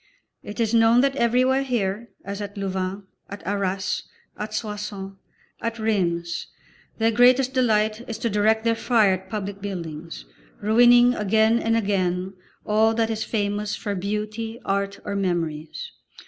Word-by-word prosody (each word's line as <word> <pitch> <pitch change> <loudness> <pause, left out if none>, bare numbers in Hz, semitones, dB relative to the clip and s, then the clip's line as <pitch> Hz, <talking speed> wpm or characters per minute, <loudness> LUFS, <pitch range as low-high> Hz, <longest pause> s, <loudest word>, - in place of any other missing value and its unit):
It 205 +1 -8
is 230 -1 +1
known 230 +1 +5
that 275 0 +1
everywhere 255 +2 +3
here, 235 -4 -2 0.2
as 200 +1 -5
at 205 0 -7
Louvain, 190 0 -3 0.3
at 200 0 -9
Arras, 195 -1 -1 0.3
at 215 +1 -5
Soissons, 210 -3 -5 0.5
at 230 0 -2
Rheims, 170 -6 -1 0.5
their 225 0 +2
greatest 250 +3 +4
delight 220 -3 +2
is 225 - -3
to 235 - -2
direct 215 +2 +2
their 230 0 +3
fire 225 -4 +3
at 190 0 -6
public 200 -2 -5
buildings, 170 -5 -6 0.3
ruining 240 +3 +6
again 220 +2 +3
and 225 0 +1
again 190 -3 0 0.3
all 220 +1 +3
that 225 0 +1
is 220 0 -2
famous 205 -1 -1
for 205 - -4
beauty, 215 +4 -3
art 200 0 -1
or 200 - -3
memories. 165 -5 -2
210 Hz, 145 wpm, -24 LUFS, 195-230 Hz, 0.5 s, ruining